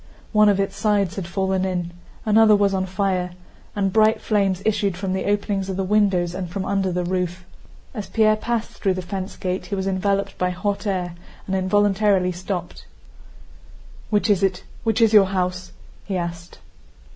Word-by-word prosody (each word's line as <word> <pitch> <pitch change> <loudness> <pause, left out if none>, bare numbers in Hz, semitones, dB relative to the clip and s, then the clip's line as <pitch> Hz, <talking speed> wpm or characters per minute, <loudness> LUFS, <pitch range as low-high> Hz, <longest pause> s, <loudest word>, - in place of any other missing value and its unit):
One 210 -1 +5
of 200 -1 +2
its 195 0 -1
sides 200 -3 +1
had 190 -4 -4
fallen 190 +1 0
in, 180 -2 -2 0.3
another 215 0 +6
was 200 -1 +2
on 190 0 -1
fire, 185 -1 -1 0.4
and 195 -2 0
bright 220 0 +4
flames 195 -3 0
issued 200 -4 +1
from 190 0 -2
the 190 - -2
openings 200 -1 -1
of 190 - -3
the 195 - 0
windows 190 -3 +2
and 180 -1 -4
from 190 +2 -4
under 195 -2 0
the 180 0 -1
roof. 180 0 -2 0.5
As 210 -5 -5
Pierre 215 -1 +4
passed 230 +1 -2
through 190 -3 -1
the 185 - -4
fence 190 +2 -5
gate, 185 -1 -3
he 200 - -2
was 190 -1 -2
enveloped 195 +1 -1
by 180 - +1
hot 200 +4 -2
air 180 -3 -1 0.3
and 190 - -2
involuntarily 195 0 +2
stopped. 180 0 -5 1.2
"Which 210 0 +2
is 205 -3 +3
it? 190 -2 0 0.2
Which 225 0 +1
is 225 -1 +4
your 205 -2 +8
house?" 180 -1 -2 0.3
he 195 -2 -3
asked. 170 0 -5
195 Hz, 180 wpm, -22 LUFS, 185-205 Hz, 1.2 s, your